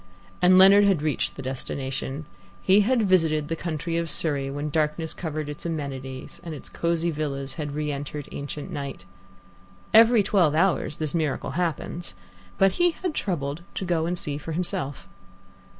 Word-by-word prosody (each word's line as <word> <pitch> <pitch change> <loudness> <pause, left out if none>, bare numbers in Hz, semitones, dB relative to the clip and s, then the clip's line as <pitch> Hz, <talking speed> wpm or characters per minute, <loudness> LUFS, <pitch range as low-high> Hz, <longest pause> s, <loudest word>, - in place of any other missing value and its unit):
And 185 +1 +6
Leonard 195 +2 +8
had 190 -7 +3
reached 155 -3 -1
the 135 - -7
destination. 135 +2 -4 0.4
He 195 +2 +6
had 235 +2 +2
visited 160 -5 +2
the 165 - 0
county 165 0 -2
of 170 -1 -3
Surrey 140 -5 +1
when 145 +2 -3
darkness 155 +1 0
covered 155 -3 -4
its 150 0 -7
amenities, 135 -5 -5
and 165 -2 -5
its 145 - -9
cosy 170 0 0
villas 140 -3 -3
had 150 -3 -4
re 150 0 -1
entered 145 0 -5
ancient 145 +4 -6
night. 140 - -5 0.9
Every 225 -1 +7
twelve 180 -7 +3
hours 170 -3 +2
this 155 -2 -1
miracle 155 -5 -1
happens, 170 - -3 0.4
but 195 0 +5
he 350 - +3
had 360 -4 0
troubled 155 - -2
to 190 - -2
go 165 -2 +1
and 175 +1 -1
see 145 -3 -3
for 160 +2 -6
himself. 145 - -2
155 Hz, 165 wpm, -25 LUFS, 145-175 Hz, 0.9 s, Leonard